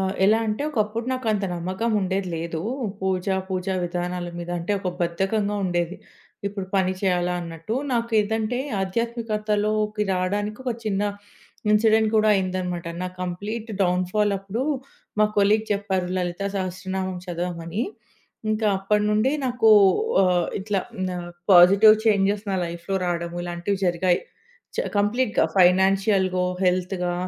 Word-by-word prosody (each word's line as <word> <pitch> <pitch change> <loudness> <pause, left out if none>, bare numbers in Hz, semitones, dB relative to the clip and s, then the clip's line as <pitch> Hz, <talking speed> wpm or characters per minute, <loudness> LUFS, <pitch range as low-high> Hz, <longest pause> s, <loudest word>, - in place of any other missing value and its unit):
ఆహ్, 190 0 -1
ఎలా 215 +3 +5
అంటే 215 +6 -1
ఒకప్పుడు 225 -2 -1
నాకంత 220 -6 0
నమ్మకం 185 +7 -2
ఉండేది 190 0 -1
లేదు. 165 0 -4 0.4
పూజ, 190 0 -1 0.2
పూజా 190 0 -2
విధానాల 175 0 -3
మీద. 175 0 -6
అంటే 170 +5 -2
ఒక 185 - -2
బద్ధకంగా 195 +4 0
ఉండేది. 175 0 -1 0.5
ఇప్పుడు 195 -2 -5
పని 185 -1 +2
చేయాలా 180 -2 +1
అన్నట్టు. 165 +5 -5 0.2
నాకు 235 -1 0
ఏదంటే 220 +3 -1 0.2
ఆధ్యాత్మికతలోకి 215 0 -1
రాడానికి 205 +5 -2
ఒక 250 - 0
చిన్న 205 -1 0 0.7
ఇన్సిడెంట్ 220 0 +4
కూడా 215 0 +4
అయిందనమాట. 185 -2 -2 0.2
నా 185 - -2
కంప్లీట్ 205 +6 -4
డౌన్‍ఫాలప్పుడు, 195 +4 0 0.6
మా 215 - +6
కొలీగ్ 210 +2 +4
చెప్పారు. 195 -3 -1
లలితా 180 +2 -2
సహస్రనామం 185 0 -3
చదవమని. 175 +2 -3 0.7
ఇంకా 215 0 0
అప్పటి 210 +2 +1
నుండి 215 +6 +2
నాకు 240 -3 +3 0.5
ఆహ్, 180 -2 +2
ఇట్లా 200 0 -1 0.4
ఆహ్, 175 0 -6 0.2
పాజిటివ్ 200 +5 +8
చేంజెస్ 200 0 +2
నా 190 - 0
లైఫ్‍లో 170 +3 -5
రాడము 170 0 -2
ఇలాంటివి 175 +3 -2
జరిగాయి. 175 0 +2 0.6
చ - - 0
కంప్లీట్‍గా. 210 +3 +2
ఫైనాన్షియల్‍గో, 190 0 +3 0.2
హెల్త్‌గా 180 0 0
195 Hz, 125 wpm, -24 LUFS, 180-215 Hz, 0.7 s, పాజిటివ్